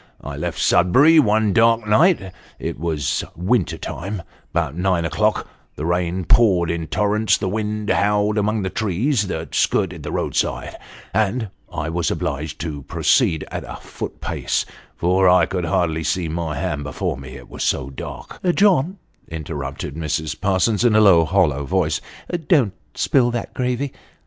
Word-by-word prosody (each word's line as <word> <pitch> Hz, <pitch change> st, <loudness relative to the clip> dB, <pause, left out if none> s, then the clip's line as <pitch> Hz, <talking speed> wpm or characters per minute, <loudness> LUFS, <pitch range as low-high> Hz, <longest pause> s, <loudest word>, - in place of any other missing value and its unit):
I -, -, -6 dB
left -, -, -4 dB
Sudbury 140 Hz, -, +5 dB
one 110 Hz, -5 st, +3 dB
dark 115 Hz, -1 st, +4 dB
night 105 Hz, -, +3 dB, 0.3 s
it -, -, -5 dB
was 80 Hz, -5 st, -1 dB
winter 90 Hz, -1 st, 0 dB
time 95 Hz, +4 st, -5 dB, 0.3 s
about 80 Hz, -3 st, -1 dB
nine 90 Hz, -1 st, +1 dB
o'clock; 80 Hz, -, 0 dB, 0.3 s
the 75 Hz, -, -4 dB
rain 90 Hz, +1 st, -1 dB
poured 90 Hz, -6 st, +4 dB
in 85 Hz, -1 st, -3 dB
torrents, 105 Hz, +3 st, +2 dB
the 95 Hz, -, -3 dB
wind 105 Hz, +1 st, -2 dB
howled 105 Hz, +1 st, +2 dB
among 105 Hz, 0 st, 0 dB
the 95 Hz, -, -2 dB
trees 110 Hz, -, 0 dB
that 80 Hz, -4 st, -5 dB
skirted -, -, +1 dB
the -, -, -6 dB
roadside, -, -, -2 dB, 0.4 s
and 110 Hz, +2 st, 0 dB, 0.2 s
I 80 Hz, -, -3 dB
was 85 Hz, -1 st, -1 dB
obliged 75 Hz, +2 st, -3 dB
to 75 Hz, -3 st, -4 dB
proceed 80 Hz, +3 st, +1 dB
at -, -, -4 dB
a -, -, -8 dB
foot -, -, -7 dB
pace, -, -, -1 dB, 0.3 s
for 90 Hz, +2 st, +3 dB
I 90 Hz, -2 st, +5 dB
could 90 Hz, -1 st, -3 dB
hardly 80 Hz, -1 st, 0 dB
see 90 Hz, +1 st, -1 dB
my 80 Hz, -1 st, -3 dB
hand 75 Hz, 0 st, -2 dB
before 75 Hz, -, -3 dB
me, 65 Hz, 0 st, -10 dB
it -, -, -11 dB
was -, -, -5 dB
so 70 Hz, 0 st, 0 dB
dark 65 Hz, -, -8 dB
" 180 Hz, -, 0 dB
" 175 Hz, -, +2 dB
John," 190 Hz, -3 st, +3 dB, 0.3 s
interrrnpted 70 Hz, -3 st, -5 dB
Mrs. 80 Hz, 0 st, -3 dB
Parsons, 100 Hz, +3 st, +2 dB
in 120 Hz, -3 st, +4 dB
a -, -, +6 dB
low, 90 Hz, -6 st, +6 dB
hollow 80 Hz, -5 st, +2 dB
voice, 80 Hz, -1 st, 0 dB, 0.2 s
" 170 Hz, -4 st, -5 dB
don't 130 Hz, -, +4 dB, 0.2 s
spill 125 Hz, -3 st, +2 dB
that 120 Hz, -1 st, -4 dB
gravy." 125 Hz, +2 st, -2 dB
95 Hz, 165 wpm, -21 LUFS, 80-110 Hz, 0.4 s, a